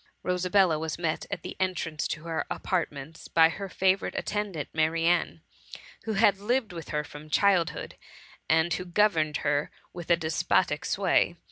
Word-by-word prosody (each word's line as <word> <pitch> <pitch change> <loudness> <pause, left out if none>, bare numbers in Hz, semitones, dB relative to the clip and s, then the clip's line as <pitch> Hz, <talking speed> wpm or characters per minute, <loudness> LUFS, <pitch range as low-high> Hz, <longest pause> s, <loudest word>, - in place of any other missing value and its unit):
Rosabella 180 -2 +2
was 160 -1 -3
met 165 -2 -2
at - - -5
the - - -6
entrance 170 -4 -1
to 150 - -5
her 165 -1 -2
apartments 160 -4 -3
by 165 -1 +5
her 195 +3 -6
favourite 190 +1 +1
attendant, 200 -8 -3
Ma 155 0 +3
rianne, 165 +2 0 0.6
who 220 - -1
had 200 -1 +4
lived 230 0 0
with 165 -2 -8
her 150 0 -1
from 150 0 -11
her - - -16
childhood, 185 0 +1 0.5
and 160 +2 +3
who 185 - -2
governed 170 -5 +2
her 145 0 +1 0.2
with 175 -2 -8
despotic 160 0 +1
sway. 185 -2 +2
170 Hz, 155 wpm, -28 LUFS, 155-190 Hz, 0.6 s, by